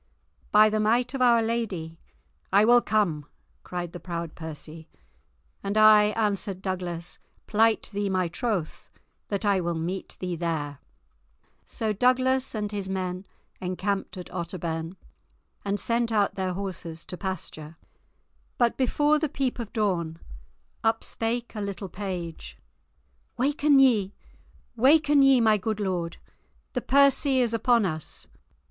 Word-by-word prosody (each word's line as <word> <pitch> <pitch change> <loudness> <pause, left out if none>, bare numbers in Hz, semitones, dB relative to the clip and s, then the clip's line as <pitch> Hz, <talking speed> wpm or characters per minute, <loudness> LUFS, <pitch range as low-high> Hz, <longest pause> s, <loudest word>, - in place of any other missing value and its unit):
"By 215 +1 +7
the 215 - 0
might 235 +4 +2
of 270 - -3
Our 235 -2 +5
Lady, 195 -8 -3 0.5
I 200 +2 +5
will 240 +1 +6
come," 175 -11 0 0.3
cried 175 -1 -5
the 175 - -7
proud 170 -3 -5
Percy. 160 0 -9 0.7
"And 200 +2 -2
I," 215 -1 +7
answered 200 -3 -1
Douglas, 180 -3 -4 0.3
"plight 225 +1 +2
thee 205 0 -1
my 185 -2 +1
troth 185 -3 -3 0.4
that 200 +1 -2
I 200 -2 +3
will 170 -1 -2
meet 175 +4 -4
thee 180 -1 -3
there." 155 -4 -3 0.9
So 220 -2 -2
Douglas 255 +3 +2
and 210 -1 -2
his 200 -2 -4
men 185 0 -3 0.3
encamped 190 +2 -2
at 180 - -8
Otterbourne, 170 -1 -4 0.7
and 200 0 -1
sent 235 0 0
out 205 -3 +2
their 190 -2 -2
horses 180 -4 -6
to - - -6
pasture. 165 -4 -6 0.8
But 240 -1 +2
before 295 +4 +2
the 310 -1 -1
peep 265 -3 -2
of 230 -3 -5
dawn, 180 -8 -1 0.7
up 225 0 +1
spake 235 +1 -3
a 215 - -5
little 200 -1 -5
page: 170 - -6 0.8
"Waken 285 +2 +3
ye, 220 -8 +4 0.6
waken 290 +4 +5
ye, 270 -2 +6
my 215 -2 +4
good 215 +2 -2
lord; 180 -4 -2 0.6
the 250 - -1
Percy 275 0 +4
is 240 -2 +2
upon 230 -1 +3
us!" 155 -4 -5
200 Hz, 135 wpm, -26 LUFS, 175-235 Hz, 0.9 s, By